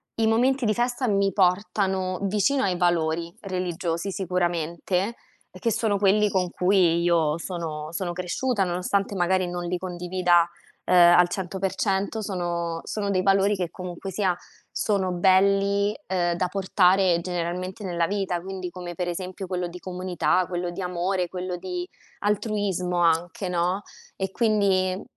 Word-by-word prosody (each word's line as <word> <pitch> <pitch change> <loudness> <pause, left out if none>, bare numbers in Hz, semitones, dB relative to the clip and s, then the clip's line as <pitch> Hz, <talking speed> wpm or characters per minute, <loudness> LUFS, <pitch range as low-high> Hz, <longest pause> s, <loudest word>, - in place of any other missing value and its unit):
i 225 -1 +1
momenti 255 +4 +2
di 215 - +3
festa 245 +2 0
mi 200 -1 +2
portano 190 -1 +1
vicino 210 +8 +1
ai 185 -3 +1
valori 170 -1 0
religiosi 180 -1 -3
sicuramente, 180 +2 -1 0.4
che 230 - -2
sono 210 -1 +1
quelli 205 +1 +3
con 185 -2 0
cui 180 -3 +3
io 165 -3 +2
sono 160 -4 -5
sono 175 0 -3
cresciuta, 195 +5 -1
nonostante 190 +3 -1
magari 185 0 +1
non 175 0 -4
li 180 +1 -1
condivida, 180 -1 +1 0.4
uhm, - - +1
al 175 0 +7
100%, 195 +3 -1
sono 175 -4 -3
sono 205 -2 -3
dei 185 -1 +2
valori 195 +1 +3
che 180 -3 -2
comunque 180 +1 -7
sia 190 -1 +1 0.4
sono 195 -3 0
belli, 195 +3 +3
uhm, 175 -2 +1
da 180 +1 0
portare 185 -1 +3
generalmente 180 +3 -4
nella 175 -3 0
vita. 195 -3 -1
Quindi 185 0 -5
come 175 -1 -7
per 175 +1 -3
esempio 185 +2 -5
quello 180 -1 -2
di 175 +1 -9
comunità, 185 0 0
quello 175 -1 -3
di 175 +2 -6
amore, 180 +1 -1
quello 180 0 -4
di 180 0 -5 0.3
altruismo 205 -4 -1
anche, 170 +3 +1
no, 180 +2 0 0.3
e 190 0 -2
quindi 200 -4 +2
n 190 - -8
185 Hz, 145 wpm, -25 LUFS, 175-195 Hz, 0.4 s, al